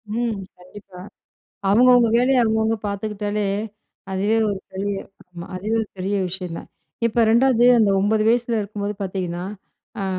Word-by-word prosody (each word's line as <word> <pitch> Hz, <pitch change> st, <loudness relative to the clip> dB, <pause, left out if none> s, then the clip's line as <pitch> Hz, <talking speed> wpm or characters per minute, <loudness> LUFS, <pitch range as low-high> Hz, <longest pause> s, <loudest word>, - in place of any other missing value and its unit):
ம். 235 Hz, -3 st, -1 dB, 0.2 s
கண்டிப்பா. 185 Hz, 0 st, -13 dB, 0.7 s
அவுங்கவுங்க 245 Hz, +1 st, +5 dB
வேலைய 250 Hz, 0 st, +3 dB
அவுங்கவுங்க 220 Hz, 0 st, +1 dB
பார்த்துக்கிட்டாலே, 205 Hz, 0 st, -3 dB, 0.7 s
அதுவே 205 Hz, +4 st, +1 dB
ஒரு 195 Hz, -, -3 dB
பெரிய 200 Hz, +2 st, -2 dB, 0.4 s
ஆமா. 175 Hz, -1 st, -9 dB
அதுவே 210 Hz, +5 st, -2 dB
ஒரு 215 Hz, -, -8 dB
பெரிய 195 Hz, +2 st, -1 dB
விஷயம் 180 Hz, -2 st, -5 dB
தான். -, -, -11 dB, 0.4 s
இப்ப 230 Hz, +1 st, +1 dB
2வது 240 Hz, 0 st, +4 dB
அந்த 210 Hz, -3 st, +4 dB
9 215 Hz, +2 st, +2 dB
வயசுல 235 Hz, 0 st, +1 dB
இருக்கும்போது 205 Hz, 0 st, -4 dB
பார்த்தீங்கன்னா, 180 Hz, -2 st, -4 dB, 0.6 s
அ -, -, -2 dB
210 Hz, 135 wpm, -22 LUFS, 195-230 Hz, 0.7 s, அவுங்கவுங்க